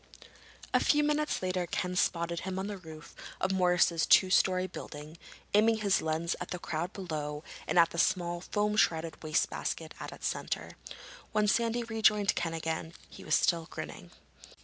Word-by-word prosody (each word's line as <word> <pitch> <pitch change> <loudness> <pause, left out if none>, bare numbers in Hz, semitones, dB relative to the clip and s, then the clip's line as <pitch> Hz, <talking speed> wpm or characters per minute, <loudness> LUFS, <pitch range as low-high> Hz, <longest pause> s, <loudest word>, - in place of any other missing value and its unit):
A - - +5
few 295 0 +3
minutes 300 -6 0
later 185 -1 -1
Ken 180 +1 -2
spotted 170 -3 0
him 185 +1 -4
on 190 - -2
the 205 -1 -5
roof 160 -2 -11 0.3
of 190 - 0
Morris's 180 -2 +3
two 185 - +6
story 185 -1 +3
building, 155 -3 -9 0.3
aiming 220 +2 +5
his 200 -2 +2
lens 160 +2 -1
at 175 - -4
the 180 - -3
crowd 170 +1 -3
below 150 -5 -5 0.2
and - - 0
at 170 -1 +6
the 170 - -4
small 175 -1 +1
foam 210 +3 0
shrouded 165 -5 +1
wastebasket 155 0 -1
at - - -6
its - - -8
center. - - -3 0.6
When 210 -1 +2
Sandy 235 +2 +1
rejoined 215 -3 +3
Ken 165 -1 -2
again 160 0 -3 0.2
he - - -11
was - - +2
still 165 -2 +2
grinning. - - -8
180 Hz, 170 wpm, -30 LUFS, 165-205 Hz, 0.6 s, two